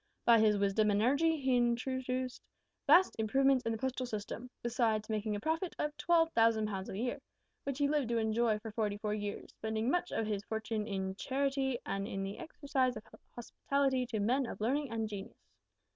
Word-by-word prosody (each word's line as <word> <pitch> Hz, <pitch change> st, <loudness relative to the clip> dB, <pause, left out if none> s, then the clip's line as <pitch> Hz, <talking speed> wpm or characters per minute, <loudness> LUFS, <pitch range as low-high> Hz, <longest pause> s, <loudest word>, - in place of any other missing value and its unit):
By 230 Hz, -1 st, +7 dB
his 215 Hz, -1 st, +4 dB
wisdom 200 Hz, +2 st, +2 dB
and 205 Hz, 0 st, +2 dB
energy 285 Hz, +8 st, +3 dB
he 260 Hz, -2 st, +2 dB
introduced 255 Hz, +1 st, -1 dB, 0.5 s
vast 345 Hz, +6 st, +6 dB
improvements 265 Hz, +4 st, +3 dB
in -, -, +1 dB
the 225 Hz, -, -2 dB
postal 255 Hz, +1 st, -2 dB
system, 225 Hz, +2 st, -5 dB
besides 230 Hz, -3 st, 0 dB
making 215 Hz, 0 st, -1 dB
a -, -, -3 dB
profit 325 Hz, -, -2 dB
of 300 Hz, 0 st, -2 dB
12,000 230 Hz, -11 st, +3 dB
pounds 195 Hz, -2 st, -4 dB
a 190 Hz, -, -5 dB
year, 245 Hz, +3 st, -2 dB, 0.4 s
which 275 Hz, -2 st, -2 dB
he 285 Hz, -1 st, +2 dB
lived 290 Hz, -4 st, 0 dB
to 235 Hz, -, +1 dB
enjoy 220 Hz, 0 st, +2 dB
for 220 Hz, +1 st, -8 dB
forty 210 Hz, -2 st, -1 dB
four 210 Hz, 0 st, -2 dB
years, 205 Hz, -1 st, -4 dB
spending 220 Hz, +3 st, -1 dB
much 355 Hz, 0 st, 0 dB
of 225 Hz, -, -1 dB
his 210 Hz, -2 st, -2 dB
fortune 220 Hz, -1 st, -3 dB
in 190 Hz, -2 st, -2 dB
charity 270 Hz, -1 st, 0 dB
and 195 Hz, 0 st, -2 dB
in 195 Hz, 0 st, -3 dB
the 195 Hz, +1 st, -5 dB
exercise 275 Hz, -5 st, -1 dB
of 215 Hz, -, -9 dB, 0.3 s
hospitality 260 Hz, +1 st, 0 dB
to 225 Hz, -3 st, -2 dB
men 250 Hz, +5 st, +1 dB
of -, -, -7 dB
learning 270 Hz, +6 st, 0 dB
and 225 Hz, -1 st, -2 dB
genius. 205 Hz, -1 st, -7 dB
235 Hz, 190 wpm, -33 LUFS, 215-270 Hz, 0.5 s, By